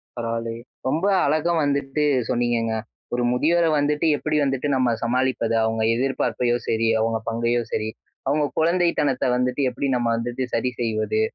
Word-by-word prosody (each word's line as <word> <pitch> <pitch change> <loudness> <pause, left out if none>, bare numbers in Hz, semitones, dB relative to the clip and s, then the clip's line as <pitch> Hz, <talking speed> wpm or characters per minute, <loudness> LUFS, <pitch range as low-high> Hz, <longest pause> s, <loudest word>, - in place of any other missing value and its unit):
பரவாயில்லையே, 115 -1 -3 0.3
ரொம்ப 160 +8 0 0.2
அழகா 155 +4 +1
வந்துட்டு 140 0 0 0.3
சொன்னீங்கங்க. 120 -2 0 0.4
ஒரு 120 0 0
முதியோர 165 +7 +2
வந்துட்டு, 150 +2 0
எப்புடி 155 0 -1
வந்துட்டு 135 +1 -1
நம்ம 125 -3 +2
சமாளிப்பது? 120 -1 0
அவுங்க 110 0 0
எதிர்பார்ப்பையோ 120 -2 0
சரி, 115 0 +1
அவங்க 115 0 +1
பங்கையோ 115 +1 0
சரி, 110 0 -1 0.4
அவங்க 145 +2 +2
குழந்தைத்தனத்த 170 -5 +2
வந்துட்டு, 125 +2 0
எப்படி 135 +3 -3
நம்ம 120 -1 0
வந்துட்டு 120 +2 -3
சரி 125 +2 0
செய்வது? 110 -2 0
125 Hz, 140 wpm, -23 LUFS, 115-145 Hz, 0.4 s, முதியோர